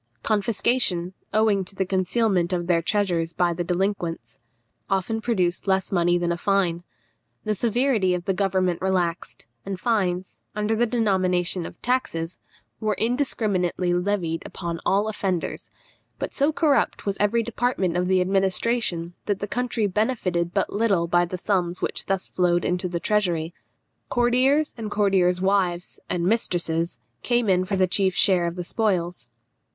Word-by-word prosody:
Confiscation, 205 Hz, -3 st, +1 dB, 0.2 s
owing 215 Hz, -3 st, +2 dB
to 190 Hz, +2 st, -8 dB
the 190 Hz, -, 0 dB
concealment 190 Hz, -1 st, +1 dB
of 175 Hz, -1 st, -1 dB
their 170 Hz, -1 st, +2 dB
treasures 175 Hz, -4 st, 0 dB
by 175 Hz, 0 st, +1 dB
the 175 Hz, +1 st, -2 dB
delinquents, 175 Hz, -, -2 dB, 0.5 s
often 195 Hz, +4 st, 0 dB
produced 190 Hz, -6 st, 0 dB
less 190 Hz, -1 st, +1 dB
money 175 Hz, -1 st, +3 dB
than 175 Hz, 0 st, 0 dB
a 170 Hz, -, -1 dB
fine. 180 Hz, -3 st, +1 dB, 0.6 s
The 215 Hz, -, 0 dB
severity 230 Hz, -3 st, +1 dB
of 175 Hz, -1 st, -5 dB
the 195 Hz, -, +1 dB
government 185 Hz, -2 st, 0 dB
relaxed, 185 Hz, -2 st, -1 dB, 0.2 s
and 195 Hz, -1 st, -5 dB
fines, 185 Hz, -5 st, -1 dB, 0.2 s
under 210 Hz, +1 st, 0 dB
the 240 Hz, +2 st, +2 dB
denomination 185 Hz, -6 st, +1 dB
of -, -, -13 dB
taxes, 185 Hz, -10 st, -1 dB, 0.4 s
were 215 Hz, -1 st, 0 dB
indiscriminately 205 Hz, -8 st, 0 dB
levied 175 Hz, -3 st, -1 dB
upon 170 Hz, -2 st, -5 dB
all 205 Hz, +2 st, +2 dB
offenders; 195 Hz, -5 st, -3 dB, 0.5 s
but -, -, -4 dB
so 285 Hz, +2 st, +2 dB
corrupt 310 Hz, -3 st, +1 dB
was 200 Hz, -1 st, 0 dB
every 225 Hz, +3 st, +2 dB
department 225 Hz, -6 st, -1 dB
of 180 Hz, 0 st, +1 dB
the 185 Hz, 0 st, +3 dB
administration, 190 Hz, -1 st, 0 dB
that 205 Hz, -2 st, +1 dB
the 205 Hz, -, -3 dB
country 245 Hz, -1 st, -1 dB
benefited 185 Hz, -5 st, 0 dB
but 195 Hz, +1 st, -1 dB
little 200 Hz, -5 st, +2 dB
by 175 Hz, +1 st, +3 dB
the 180 Hz, +1 st, -5 dB
sums 180 Hz, -2 st, 0 dB
which -, -, -3 dB
thus 195 Hz, -1 st, 0 dB
flowed 175 Hz, -1 st, +1 dB
into 180 Hz, +1 st, 0 dB
the 175 Hz, -1 st, -3 dB
treasury. 175 Hz, -4 st, 0 dB, 0.6 s
Courtiers 255 Hz, +5 st, +2 dB
and 220 Hz, -2 st, -4 dB
courtiers' 190 Hz, -4 st, +2 dB
wives 190 Hz, -3 st, 0 dB
and 175 Hz, -1 st, -1 dB
mistresses 175 Hz, -5 st, 0 dB, 0.2 s
came 240 Hz, -2 st, +1 dB
in 185 Hz, -1 st, +3 dB
for 195 Hz, +1 st, -1 dB
the 190 Hz, -1 st, +3 dB
chief 190 Hz, 0 st, +2 dB
share 180 Hz, -3 st, +3 dB
of 170 Hz, -, -4 dB
the 180 Hz, -, -4 dB
spoils. 175 Hz, -, -1 dB
190 Hz, 155 wpm, -24 LUFS, 175-215 Hz, 0.6 s, money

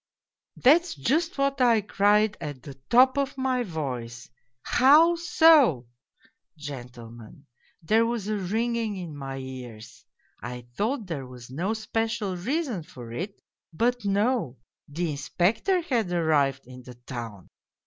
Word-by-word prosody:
" -, -, -66 dB
That's 325 Hz, -, +4 dB
just 310 Hz, -, 0 dB
what 275 Hz, -1 st, 0 dB
I 235 Hz, -3 st, +4 dB
cried 210 Hz, +1 st, +2 dB
at 145 Hz, -5 st, -6 dB
the 140 Hz, -, -9 dB, 0.2 s
top 260 Hz, +3 st, +5 dB
of 275 Hz, -1 st, -2 dB
my 260 Hz, -1 st, 0 dB
voice, 125 Hz, -, -5 dB, 0.2 s
' 125 Hz, 0 st, -52 dB, 0.2 s
How 300 Hz, +7 st, +7 dB
so? 315 Hz, -, +4 dB, 0.3 s
' -, -, -30 dB, 0.2 s
Gentlemen, 125 Hz, -3 st, -10 dB, 0.4 s
there 220 Hz, +7 st, +3 dB
was 230 Hz, -4 st, -3 dB
a 215 Hz, -, -1 dB
ringing 220 Hz, +2 st, -1 dB
in 170 Hz, -5 st, -7 dB
my 135 Hz, -1 st, -6 dB
ears. 125 Hz, -4 st, -9 dB, 0.4 s
I 120 Hz, 0 st, -7 dB
thought 225 Hz, +2 st, -1 dB
there 145 Hz, -8 st, -5 dB
was 125 Hz, -1 st, -12 dB
no 180 Hz, +11 st, -2 dB
special 220 Hz, -2 st, -2 dB
reason 250 Hz, -, -2 dB
for 125 Hz, -6 st, -11 dB
it 190 Hz, -, -6 dB, 0.3 s
but 240 Hz, +7 st, 0 dB
no, 205 Hz, -, 0 dB, 0.3 s
the 165 Hz, +3 st, -3 dB
Inspector 200 Hz, -, 0 dB
had 235 Hz, -, -1 dB
arrived 145 Hz, -6 st, +1 dB
in 125 Hz, 0 st, -12 dB
the 125 Hz, 0 st, -12 dB
town. 120 Hz, -5 st, -8 dB
185 Hz, 140 wpm, -26 LUFS, -, 0.4 s, How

